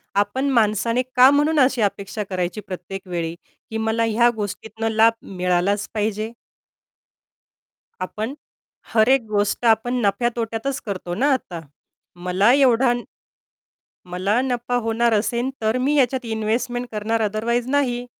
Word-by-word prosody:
आपण 230 Hz, +8 st, +1 dB
माणसाने 230 Hz, 0 st, +2 dB
का 255 Hz, +1 st, +8 dB
म्हणून 295 Hz, +2 st, +2 dB
अशी 255 Hz, -3 st, +3 dB
अपेक्षा 200 Hz, 0 st, -2 dB
करायची 185 Hz, +2 st, -2 dB
प्रत्येक 190 Hz, 0 st, -8 dB
वेळी, 170 Hz, -2 st, -3 dB, 0.3 s
की 220 Hz, -, -3 dB
मला 220 Hz, +1 st, 0 dB
ह्या 235 Hz, +2 st, +4 dB
गोष्टीतनं 220 Hz, +2 st, -4 dB
लाभ 225 Hz, +1 st, +4 dB, 0.2 s
मिळालाच 180 Hz, +3 st, +1 dB
पाहिजे. 215 Hz, +1 st, -2 dB, 1.7 s
आपण 220 Hz, +8 st, -5 dB, 0.6 s
हर 220 Hz, +1 st, +4 dB
एक 265 Hz, -2 st, +4 dB
गोष्ट 205 Hz, +2 st, 0 dB
आपण 230 Hz, +2 st, +3 dB
नफ्या-तोट्यातच 235 Hz, +3 st, -1 dB
करतो 185 Hz, -3 st, -4 dB
ना 275 Hz, +9 st, +2 dB
आता. 180 Hz, -10 st, -3 dB, 0.7 s
मला 195 Hz, +6 st, +4 dB
एवढा 260 Hz, -2 st, +4 dB, 1.2 s
मला 195 Hz, +6 st, +1 dB
नफा 245 Hz, -1 st, -2 dB
होणार 225 Hz, +1 st, +1 dB
असेल, 235 Hz, +4 st, 0 dB
तर 220 Hz, +3 st, +1 dB
मी 295 Hz, +1 st, +2 dB
याच्यात 260 Hz, -2 st, +1 dB
इन्व्हेस्टमेंट 235 Hz, +3 st, -2 dB
करणार. 220 Hz, +1 st, -1 dB
ओथरवाईज 235 Hz, +3 st, -1 dB
नाही. 250 Hz, -4 st, 0 dB
225 Hz, 125 wpm, -22 LUFS, 205-245 Hz, 1.7 s, का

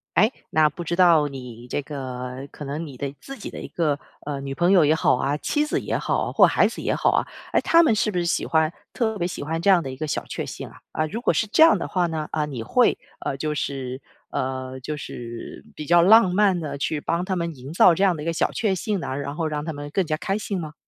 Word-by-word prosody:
诶， 215 Hz, +8 st, +4 dB, 0.2 s
那 155 Hz, -1 st, +4 dB
不 160 Hz, +4 st, -7 dB
知 170 Hz, +1 st, -2 dB
道 170 Hz, -5 st, +5 dB
你 125 Hz, -3 st, -9 dB
这 145 Hz, -, -1 dB
个 130 Hz, -1 st, -6 dB
可 150 Hz, -, -9 dB
能 145 Hz, +4 st, -4 dB
你 140 Hz, -, -10 dB
的 140 Hz, +2 st, -4 dB
自 275 Hz, 0 st, -9 dB
己 210 Hz, -, -7 dB
的 -, -, -8 dB
一 -, -, -7 dB
个， 150 Hz, -4 st, 0 dB, 0.3 s
呃， 145 Hz, -2 st, -3 dB
女 135 Hz, 0 st, -5 dB
朋 175 Hz, +5 st, +3 dB
友 180 Hz, -5 st, +6 dB
也 150 Hz, -, +4 dB
好 160 Hz, -, +3 dB
啊， 140 Hz, +3 st, 0 dB
妻 295 Hz, -, 0 dB
子 300 Hz, -, -1 dB
也 -, -, -2 dB
好， -, -, -1 dB
或 -, -, +7 dB
孩 -, -, +3 dB
子 -, -, -4 dB
也 -, -, 0 dB
好 -, -, +2 dB
啊， -, -, +1 dB, 0.3 s
诶， -, -, +4 dB
他 335 Hz, 0 st, +5 dB
们 235 Hz, -, +4 dB
是 215 Hz, 0 st, +1 dB
不 180 Hz, -, -2 dB
是 175 Hz, -, 0 dB
喜 170 Hz, -, 0 dB
欢 160 Hz, 0 st, +2 dB, 0.2 s
特 220 Hz, -3 st, -1 dB
别 175 Hz, -3 st, -1 dB
喜 175 Hz, -, -6 dB
欢 165 Hz, +2 st, -2 dB
这 200 Hz, -, +4 dB
样 185 Hz, -3 st, +6 dB
的 135 Hz, -, -5 dB
一 -, -, -8 dB
个 155 Hz, +3 st, -3 dB
小 -, -, -2 dB
确 -, -, -4 dB
幸 -, -, -7 dB
啊？ -, -, -16 dB
啊， 155 Hz, -, -1 dB
如 220 Hz, +9 st, -5 dB
果 -, -, +2 dB
是 225 Hz, -, +1 dB
这 220 Hz, +9 st, +3 dB
样 325 Hz, -, +7 dB
的 -, -, -3 dB
话 180 Hz, -2 st, 0 dB
呢， 160 Hz, -2 st, -3 dB
啊， 150 Hz, -1 st, 0 dB
你 130 Hz, -6 st, -5 dB
会 245 Hz, -, +3 dB, 0.3 s
呃， 135 Hz, -, -2 dB
就 150 Hz, +1 st, -2 dB
是 130 Hz, -3 st, -4 dB, 0.3 s
呃， 130 Hz, 0 st, -3 dB
就 150 Hz, +4 st, -4 dB
是 120 Hz, -4 st, -8 dB
比 150 Hz, -, -6 dB
较 175 Hz, 0 st, +5 dB
浪 195 Hz, 0 st, +6 dB
漫 200 Hz, -2 st, +3 dB
地 150 Hz, -4 st, -4 dB
去 150 Hz, +2 st, -1 dB
帮 170 Hz, +4 st, -1 dB
他 190 Hz, -1 st, -2 dB
们 170 Hz, -2 st, -2 dB
营 135 Hz, +3 st, -9 dB
造 175 Hz, +1 st, +6 dB
这 190 Hz, -, -1 dB
样 190 Hz, -3 st, +4 dB
的 150 Hz, -, -6 dB
一 -, -, -8 dB
个 165 Hz, -, +1 dB
小 165 Hz, -, 0 dB
确 210 Hz, -4 st, 0 dB
幸 205 Hz, +2 st, -2 dB
呢， -, -, -5 dB
然 140 Hz, +1 st, -5 dB
后 165 Hz, -, -1 dB
让 150 Hz, -1 st, -3 dB
他 160 Hz, -, -3 dB
们 145 Hz, 0 st, -7 dB
更 195 Hz, -, +1 dB
加 155 Hz, -1 st, -1 dB
开 195 Hz, +5 st, -2 dB
心 200 Hz, -3 st, -3 dB
吗？ 155 Hz, -2 st, -6 dB
155 Hz, 295 characters per minute, -24 LUFS, 140-185 Hz, 0.3 s, 或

